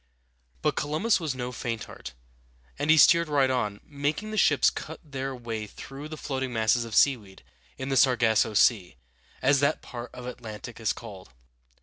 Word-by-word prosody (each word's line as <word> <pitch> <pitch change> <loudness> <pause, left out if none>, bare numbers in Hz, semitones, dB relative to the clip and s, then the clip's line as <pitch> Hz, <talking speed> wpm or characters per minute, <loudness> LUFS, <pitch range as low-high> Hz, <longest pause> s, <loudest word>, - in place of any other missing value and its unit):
But - - +1
Columbus 155 +10 +1
was 155 -6 -3
no 125 -1 -4
faint 115 -2 -4
heart, 60 - -10 0.7
and 150 - -1
he 160 - +7
steered 170 +1 +6
right 140 -3 +3
on, 105 -5 -1
making 150 +9 -3
the - - -4
ships 145 -6 +4
cut 160 - -7
their 135 -3 -5
way 115 -3 -5
through 135 +7 -9
the 155 - -7
floating 135 -3 -3
masses 115 +1 +2
of 115 -2 -6
seaweed 110 -9 +2 0.3
in 130 +1 -5
the 135 - +1
Sar 125 0 +5
gas´so 110 -2 +2
Sea, 100 - +3 0.5
as 140 +1 +4
that 140 +3 +1
part 120 -1 -7
of 125 - -10
the 125 - -4
Atlantic 115 0 -9
is 110 -2 0
called. 100 - -9
130 Hz, 185 wpm, -27 LUFS, 115-145 Hz, 0.7 s, he